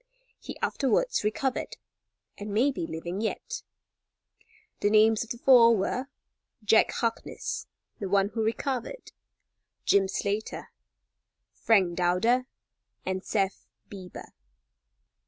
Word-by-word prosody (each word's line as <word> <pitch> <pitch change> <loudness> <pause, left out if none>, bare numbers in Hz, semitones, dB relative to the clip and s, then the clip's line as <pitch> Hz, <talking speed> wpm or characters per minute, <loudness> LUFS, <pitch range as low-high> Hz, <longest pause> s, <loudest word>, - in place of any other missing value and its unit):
He - - -8
afterwards 405 - +1
recovered, 245 +5 -2 0.6
and 205 0 -7
may 240 +8 +3
be 170 -11 -4
living 170 +4 -5
yet. 220 - -3 1.2
The 205 - +2
names 220 +1 +4
of 230 - -13
the 240 - -4
four 235 -3 +6
were: 250 +7 -2 0.6
Jack 220 +1 +4
Harkness, 230 -1 -3 0.3
the 195 - -4
one 200 0 +3
who 225 +1 -3
recovered; 265 - -3 0.7
Jim 195 -1 +4
Slater, 200 +2 -3 0.8
Frank 185 -6 +2
Dowder 225 +9 +2 0.6
and 190 0 -2
Seth 195 - -1 0.2
Beeber. 185 -3 -9
215 Hz, 105 wpm, -28 LUFS, 195-240 Hz, 1.2 s, four